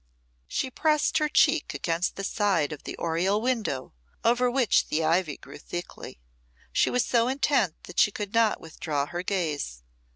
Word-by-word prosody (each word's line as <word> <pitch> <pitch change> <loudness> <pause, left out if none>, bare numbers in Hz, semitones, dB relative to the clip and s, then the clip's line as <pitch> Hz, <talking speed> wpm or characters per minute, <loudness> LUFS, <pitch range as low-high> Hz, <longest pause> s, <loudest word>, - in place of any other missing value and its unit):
She 260 - -2
pressed 310 +2 +2
her 305 -1 +1
cheek 310 +1 +3
against 170 +1 -1
the 195 - -5
side 195 -7 +1
of 150 - -11
the - - -6
oriel 175 +5 +1
window, 220 - -2 0.3
over 245 +2 +3
which 250 -2 +2
the 160 +2 0
ivy 160 -1 +1
grew - - -12
thickly. 175 - -7 0.5
She - - +3
was 250 - +1
so 235 -1 +2
intent 265 - +1
that 175 - -5
she - - +6
could 205 0 -5
not 230 -2 +3
withdraw 155 -3 -3
her 175 +3 -4
gaze. 155 - -2
195 Hz, 165 wpm, -27 LUFS, 165-245 Hz, 0.5 s, she